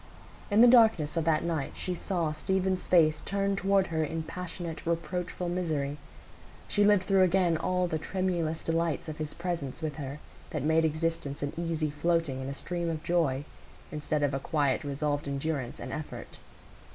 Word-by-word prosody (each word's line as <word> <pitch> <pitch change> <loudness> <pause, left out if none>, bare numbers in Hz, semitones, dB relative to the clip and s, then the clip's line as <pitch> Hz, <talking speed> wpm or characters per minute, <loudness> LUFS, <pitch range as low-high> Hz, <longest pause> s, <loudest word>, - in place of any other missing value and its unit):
In 205 +1 +5
the 245 - +9
darkness 225 -11 +5
of 165 -2 0
that 160 -2 +2
night 160 -5 -2
she 185 - -3
saw 170 -3 -1
Stephen's 185 +4 -1
face 155 -4 +4
turned 200 0 0
toward 195 0 +3
her 160 0 +2
in 160 +1 -3
passionate, 170 -1 -6
reproachful 175 +1 -2
misery; 155 -5 -1 0.7
she 205 - +2
lived 205 -2 +5
through 195 0 +3
again 180 -2 +4
all 180 +3 +1
the 160 -3 -1
tremulous 170 -2 -1
delights 165 -2 0
of 155 0 -6
his 155 -1 -4
presence 170 -6 -3
with 155 -2 -4
her 140 -1 -5 0.3
that 150 -4 -3
made 160 +1 +3
existence 155 -3 -1
an 145 - -2
easy 165 -3 -1
floating 150 -3 0
in 130 - -4
a 140 - -4
stream 170 +2 -3
of 160 -1 -3
joy, 150 -6 +1 0.5
instead 150 0 -1
of 145 -1 +1
a 135 - 0
quiet 145 0 +1
resolved 145 0 -1
endurance 140 -2 -2
and - - -6
effort. 155 - -7
165 Hz, 175 wpm, -29 LUFS, 150-180 Hz, 0.7 s, the